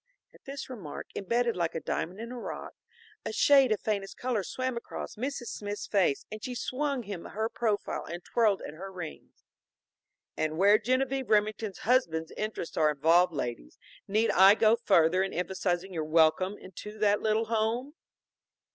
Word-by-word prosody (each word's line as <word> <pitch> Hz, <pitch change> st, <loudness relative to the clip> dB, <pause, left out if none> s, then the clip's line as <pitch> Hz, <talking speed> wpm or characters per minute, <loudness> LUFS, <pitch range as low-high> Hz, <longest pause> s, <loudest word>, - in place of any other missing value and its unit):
At -, -, -21 dB
this 275 Hz, 0 st, -6 dB
remark, 205 Hz, -, -8 dB
embedded 235 Hz, +4 st, 0 dB
like 170 Hz, -2 st, -1 dB
a -, -, -1 dB
diamond 180 Hz, +4 st, -3 dB
in 230 Hz, +1 st, -6 dB
a 250 Hz, -, -6 dB
rock, -, -, -6 dB, 0.5 s
a -, -, -3 dB
shade 270 Hz, +2 st, +5 dB
of 215 Hz, -, +2 dB
faintest 200 Hz, -3 st, -2 dB
color 245 Hz, -4 st, -1 dB
swam 255 Hz, +6 st, -3 dB
across 235 Hz, -, -6 dB
Mrs. 245 Hz, +1 st, -4 dB
Smith's 205 Hz, 0 st, -5 dB
face 185 Hz, -9 st, +1 dB
and 215 Hz, 0 st, -7 dB
she 250 Hz, -, -4 dB
swung 275 Hz, +1 st, -2 dB
him 200 Hz, -5 st, -7 dB
her 220 Hz, +2 st, -2 dB
profile 220 Hz, -3 st, -2 dB
and 175 Hz, +1 st, -7 dB
twirled 215 Hz, -5 st, +2 dB
at -, -, -7 dB
her 190 Hz, +5 st, -8 dB
rings. 175 Hz, -4 st, -9 dB, 0.9 s
"And 155 Hz, 0 st, -1 dB
where 200 Hz, +4 st, +6 dB
Genevieve 255 Hz, +1 st, 0 dB
Remington's 215 Hz, -1 st, +1 dB
husband's 165 Hz, -10 st, +2 dB
interests 215 Hz, -5 st, -5 dB
are 155 Hz, -1 st, +4 dB
involved, 165 Hz, +5 st, +4 dB
ladies, 120 Hz, -, -5 dB, 0.3 s
need 215 Hz, +3 st, +2 dB
I 195 Hz, +3 st, +7 dB
go 220 Hz, 0 st, +5 dB
further 185 Hz, -4 st, +3 dB
in 195 Hz, -, -1 dB
emphasizing 180 Hz, +1 st, -2 dB
your 160 Hz, -2 st, -2 dB
welcome 160 Hz, +5 st, +3 dB
into 210 Hz, +3 st, -10 dB
that 205 Hz, -1 st, +2 dB
little 220 Hz, +1 st, +1 dB
home?" 230 Hz, +5 st, -1 dB
210 Hz, 165 wpm, -29 LUFS, 180-235 Hz, 0.9 s, I